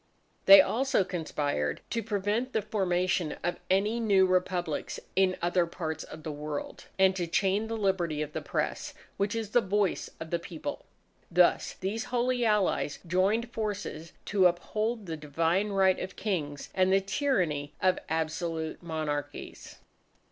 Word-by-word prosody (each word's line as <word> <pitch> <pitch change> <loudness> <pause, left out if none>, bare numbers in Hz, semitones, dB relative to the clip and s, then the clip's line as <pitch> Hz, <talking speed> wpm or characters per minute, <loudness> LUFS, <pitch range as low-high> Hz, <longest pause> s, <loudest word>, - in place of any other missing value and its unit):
They 295 0 +12
also 265 -4 +1
conspired 145 - -2
to 230 - 0
prevent 215 +4 -1
the 220 - 0
formation 180 -5 0
of 175 - -1
any 205 +5 +2
new 200 -4 +4
Republics 180 -3 -1 0.2
in 190 -1 +3
other 175 0 +2
parts 160 -1 -4
of 155 - -11
the 155 - -4
World, 150 0 -6
and 190 0 +4
to 175 -2 -2
chain 195 +5 +1
the 225 0 -3
liberty 175 -7 0
of 150 0 -8
the - - -3
Press, - - -3 0.2
which 200 +2 0
is 220 -2 -3
the 245 - +4
Voice 200 -2 0
of 160 0 -7
the 170 - +1
People. 175 - -6 0.4
Thus - - +3
these 215 +6 -3
Holy 250 0 0
Allies 210 -9 +1
joined 200 +7 +1
forces 200 -7 -4
to 195 -3 +4
uphold 215 +5 -2
the 165 -2 -4
divine 165 +7 0
right 190 -2 +3
of 185 - -5
Kings 150 -9 -3
and 185 0 +3
the 195 - +5
tyranny 190 - -1
of 185 -1 +2
absolute 160 0 -2
monarchies. 150 -3 -5
185 Hz, 150 wpm, -29 LUFS, 165-210 Hz, 0.4 s, They